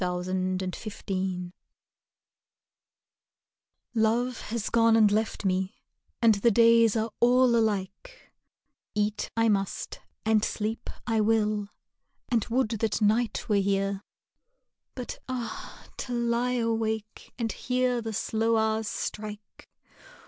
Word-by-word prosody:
Ashes 180 0 -2 0.3
of 190 +3 -6
Life 185 -2 -2 2.4
Love 235 +2 +1
has 225 -1 -2
gone 230 -1 +5
and 215 -2 +5
left 215 0 -1
me 190 0 0 0.5
and 225 -1 +7
the 205 +3 +3
days 230 0 +5
are 225 0 0
all 245 0 +5
alike; 215 - -2 0.6
Eat 210 0 0
I 225 0 +4
must, 195 -3 -1 0.3
and 220 -1 +3
sleep 220 +1 -2 0.2
I 225 -2 +1
will, 210 -1 +1 0.6
and 235 -4 +2
would 240 -1 +1
that 225 -1 -1
night 220 +3 +1
were 210 -3 +3
here! 195 0 0 0.9
But 250 -2 -6
ah! 240 -3 -6
to 250 - -4
lie 240 +1 +1
awake 225 -2 -2
and 230 -3 -1
hear 250 -1 0
the 225 -1 -4
slow 225 +2 +1
hours 220 0 +1
strike! 210 -1 -6
220 Hz, 115 wpm, -28 LUFS, 205-235 Hz, 2.4 s, and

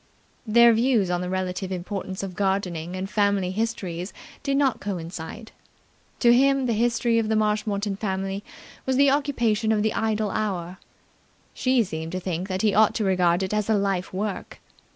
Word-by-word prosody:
Their 235 +2 +6
views 225 -5 +2
on 175 0 0
the 180 - -3
relative 185 0 -3
importance 190 +1 -4
of 185 -2 -6
gardening 185 -3 -1
and 185 +1 -3
family 200 -3 +1
histories 190 -4 -3 0.3
did 275 -1 0
not 275 -3 +2
coincide. 175 +1 -6 0.7
To 235 -1 +6
him 275 +1 +3
the 235 - +1
history 230 +1 +2
of 220 -1 -1
the 220 - +2
Marshmoreton 210 -2 0
family 195 -1 -3 0.4
was 260 - +2
the 280 +1 +5
occupation 240 -7 +1
of 210 -1 +2
the 220 - +1
idle 220 -2 0
hour: 185 -4 -3 0.7
she 255 -2 +2
seemed 160 -3 -6
to 185 - -1
think 180 0 -3
that 190 0 -2
he 210 -2 +3
ought 215 +1 +4
to 220 - 0
regard 180 -2 +2
it 190 - -3
as 210 0 0
a 220 - +4
life 195 -2 -1
work. 200 +1 -4
205 Hz, 175 wpm, -25 LUFS, 185-225 Hz, 0.7 s, Their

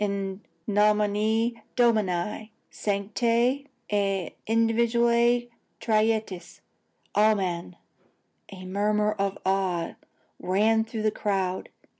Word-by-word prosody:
In 200 -1 -3 0.3
nomine 210 +2 +2
Domini, 215 -3 +1 0.2
sanctae 230 +7 0 0.2
et 195 -4 -1
individuae 235 +1 +2 0.3
trinitatis, 215 -5 -1 0.5
amen!" 190 -5 +1 0.7
A 185 -1 -9
murmur 210 +2 +1
of 195 0 -1
awe 190 -3 0 0.5
ran 220 +4 +2
through 225 -1 -5
the 215 - +2
crowd. 190 -3 -2
210 Hz, 80 wpm, -26 LUFS, 195-225 Hz, 0.7 s, nomine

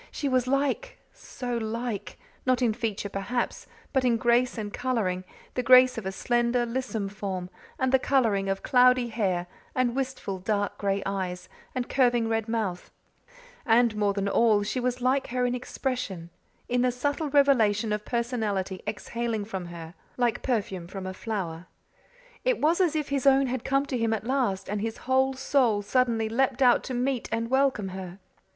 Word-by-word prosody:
She 285 - -3
was 255 -2 +1
like 285 - 0 0.2
so 245 -2 -5
like; 225 -1 -4 0.3
not 255 0 +2
in 230 -3 +3
feature, 215 -2 -3
perhaps, 200 +5 -3 0.3
but 265 -2 +2
in 240 -2 +3
grace 240 +2 +2
and 210 -2 -4
colouring 220 -8 -1 0.3
the 250 - 0
grace 255 0 +7
of 220 -4 -5
a - - -1
slender, 240 +3 +1
lissome 230 -4 -3
form 195 -3 -5 0.3
and 260 -1 +1
the 265 - +5
colouring 225 -8 +2
of 195 0 -2
cloudy 250 -1 +4
hair 190 -6 0 0.3
and 255 -1 +1
wistful, 260 -8 -3
dark 205 +1 -1
gray 200 -1 0
eyes, 185 -2 -3 0.3
and 250 -1 -2
curving 240 -3 +2
red 225 -1 -1
mouth; 210 -6 -2 0.7
and 230 -2 +4
more 205 -1 +1
than 200 0 -1
all, 210 0 +3
she 230 +5 -2
was 250 0 -1
like 260 +2 +1
her 250 +1 0
in 245 - 0
expression 245 -9 -4 0.4
in 245 0 +1
the 250 0 +3
subtle 285 +5 -2
revelation 230 -7 +3
of 210 0 -2
personality 215 -6 -2
exhaling 220 0 -3
from 190 -4 -5
her 170 -1 -9 0.2
like 240 -2 +1
perfume 205 -8 -2
from 190 +1 -7
a 185 - -4
flower. 185 -6 -4 0.8
It - - +1
was 330 +5 +3
as 340 -4 +2
if 300 -2 -1
his 280 -1 0
own 270 0 +6
had 255 -1 -3
come 275 +1 +1
to 265 -3 -2
him 225 -1 +1
at 220 0 -3
last 235 -8 0
and 205 +1 -2
his 225 +1 -3
whole 265 +1 +3
soul 245 -6 +2
suddenly 230 0 +1
leaped 260 +3 +1
out 245 -1 +5
to 255 - -4
meet 250 0 -1
and 230 +1 -2
welcome 265 -7 +2
her. 185 -1 -7
235 Hz, 175 wpm, -27 LUFS, 205-255 Hz, 0.8 s, grace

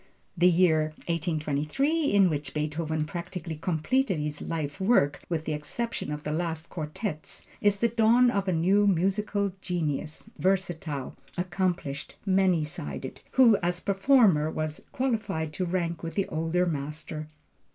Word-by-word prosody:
The 180 0 +5
year 160 -3 +3
1823 165 - 0
in 200 -2 +5
which 145 -2 -4
Beethoven 155 +1 -1
practically 170 0 -5
completed 180 - 0
his 150 0 -3
life 150 -3 -3
work 150 - +3
(with 160 -2 -2
the 155 - -1
exception 150 +9 -3
of 150 0 -4
the 150 - -3
last 165 0 -2
quartets) 155 +1 -5 0.2
is 205 -2 +3
the 235 - +3
dawn 235 +2 +4
of 200 -2 -1
a - - +2
new 190 +5 +3
musical 200 +2 +1
genius, 155 -4 -3
versatile, 175 -7 -1 0.2
accomplished, 175 -6 -2
many 185 -4 +3
sided, 75 - -6
who 235 -5 +6
as 175 0 -1
performer 195 - +4
was 155 -1 -3
qualified 215 - -1
to 185 - -1
rank 170 -2 -1
with 165 -1 -5
the 195 - +1
older 165 +3 +1
master. 155 0 -4
170 Hz, 140 wpm, -28 LUFS, 155-195 Hz, 0.2 s, who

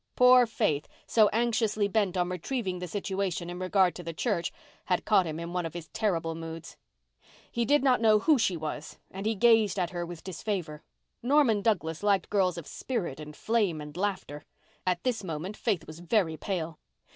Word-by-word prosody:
Poor 250 -1 +7
Faith, 180 -10 0 0.2
so 215 -3 +4
anxiously 220 -2 +1
bent 200 -3 0
on 175 -1 +1
retrieving 185 +1 -3
the 180 - -5
situation 190 -2 -2
in 175 - -6
regard 185 -1 +3
to - - -8
the 165 -1 -6
church, 180 -4 -1 0.3
had 180 -2 0
caught 195 -5 +4
him 155 0 -4
in 170 +1 -6
one 180 -1 0
of 165 0 -6
his 165 -3 -7
terrible 165 -6 -1
moods. 165 0 -8 0.8
He 235 0 0
did 290 +3 +3
not 255 -4 +3
know 215 -2 +6
who 295 +5 +3
she 190 -6 +1
was 155 -1 -6
and 195 +3 -4
he 220 - +1
gazed 225 -2 +4
at 180 -3 0
her 175 -1 -3
with 170 -1 -8
disfavour. 180 -4 -4 0.4
Norman 250 -5 +3
Douglas 165 -7 0
liked 200 -3 +1
girls 185 -4 +2
of 170 - -6
spirit 190 - -4
and 150 0 -9
flame 210 -7 0
and 150 0 -8
laughter. 185 -6 -3 0.4
At 180 -1 0
this 245 -5 -1
moment 175 +3 -4
Faith 195 -10 -1
was 155 +1 -10
very 175 -2 +1
pale. 165 -3 -4
185 Hz, 190 wpm, -29 LUFS, 165-215 Hz, 0.8 s, Poor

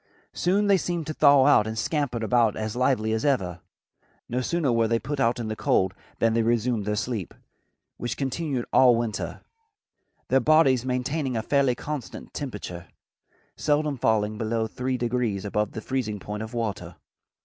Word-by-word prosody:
Soon 195 +4 +1
they 200 -1 +5
seemed 175 -3 -2
to 155 - -4
thaw 140 -3 +6
out 125 -7 +5
and 110 0 -4
scampered 125 -1 -1
about 115 -1 +3
as 110 0 -4
lively 120 -4 +1
as 110 - -1
ever. 95 - 0 0.7
No 125 +2 -1
sooner 155 0 0
were 115 -1 +2
they 115 +1 +2
put 145 +4 -4
out 120 -1 +2
in 115 - -3
the 110 - -3
cold 95 -3 +1 0.2
than 115 -1 +2
they 115 - +2
resumed 115 -1 0
their 105 0 0
sleep, 105 -4 -3 0.6
which 120 - -4
continued 135 -2 -2
all 125 -2 +6
winter, 115 -2 -3 0.9
their 135 - +4
bodies 135 -3 +4
maintaining 130 +1 -1
a 110 - -2
fairly 135 -1 +2
constant 150 0 -6
temperature, 105 - -6 0.7
seldom 150 -1 +1
falling 110 -3 0
below 110 0 0
three 125 +3 -3
degrees 120 -4 -1
above 105 0 -1
the 110 - -5
freezing 110 -5 -2
point 105 +2 -6
of 110 +2 -7
water. 100 -7 -3
120 Hz, 170 wpm, -25 LUFS, 110-135 Hz, 0.9 s, thaw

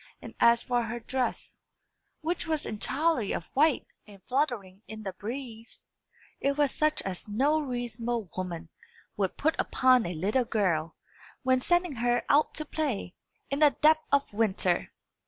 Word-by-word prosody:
And - - -10
as 235 0 +5
for 245 -2 +1
her 240 +2 -4
dress, 255 +2 -3 0.6
which 330 +1 -2
was 315 -2 0
entirely 255 +2 0
of 165 - -3
white, 295 +1 +3 0.2
and 200 -2 -14
fluttering 240 -9 -1
in 220 0 -8
the 195 -2 -4
breeze, 230 +2 -8 0.5
it 280 +1 0
was 290 -2 +3
such 305 0 +1
as 190 0 -5
no 275 +9 +2
reasonable 240 -5 -3
woman 175 -3 -5 0.5
would 195 -2 -1
put 315 +2 +2
upon 255 -5 +3
a 175 - -4
little 210 +10 +1
girl, 170 -8 0 0.5
when 260 0 +3
sending 350 -3 +1
her 240 +1 +1
out 295 +2 +3
to 310 - -3
play, 275 - -2 0.4
in 275 - 0
the 295 -3 +5
depth 310 +1 +5
of 280 -6 +2
winter. 195 -4 0
245 Hz, 155 wpm, -29 LUFS, 205-285 Hz, 0.6 s, as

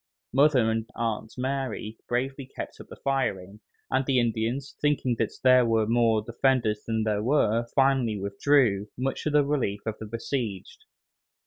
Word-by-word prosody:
Mother 135 -4 +4
and 115 +1 -2
Aunt 115 -1 -2
Mary 130 -4 -3
bravely 130 +2 -2
kept - - -8
up - - -13
the - - -10
firing, 105 -8 -2 0.3
and 130 +1 +2
the 130 -1 +2
Indians, 120 +3 -1
thinking 145 -4 +1
that 115 - +1
there 130 -1 +6
were 115 -2 +2
more 115 -1 +2
defenders 120 -2 +1
than 110 -1 0
there 105 -1 0
were, 115 -2 +2
finally 135 -5 +3
withdrew, 100 +1 +2
much 130 +2 -2
to - - +2
the 150 -1 +3
relief 125 -9 -1
of 110 -1 -4
the 110 - -7
besieged. 115 -3 -4
120 Hz, 155 wpm, -27 LUFS, 110-135 Hz, 0.3 s, there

